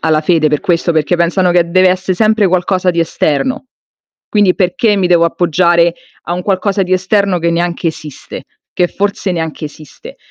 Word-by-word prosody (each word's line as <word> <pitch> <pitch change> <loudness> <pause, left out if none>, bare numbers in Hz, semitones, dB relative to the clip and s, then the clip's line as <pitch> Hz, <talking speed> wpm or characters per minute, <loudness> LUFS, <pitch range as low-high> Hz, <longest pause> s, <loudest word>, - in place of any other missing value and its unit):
alla 155 -1 +1
fede 155 -1 +2
per 150 - 0
questo, 175 -3 0
perché 160 +2 0
pensano 175 +1 +1
che 170 -1 +1
dev'essè 185 0 +2
sempre 215 -1 +2
qualcosa 185 0 0
di 170 - -4
esterno. 165 - -1 0.6
Quindi 205 -4 +2
perché 195 +3 +1
mi 185 -2 +1
devo 170 -1 +3
appoggiare 170 0 +2 0.3
a 175 - -5
un 180 - -4
qualcosa 195 0 0
di 185 0 -3
esterno 190 0 +1
che 170 0 0
neanche 170 0 -2
esiste? 155 -3 -9 0.3
Che 175 -1 0
forse 200 -1 -2
neanche 160 -2 -4
esiste. 150 -1 -13
180 Hz, 170 wpm, -13 LUFS, 170-190 Hz, 0.6 s, devo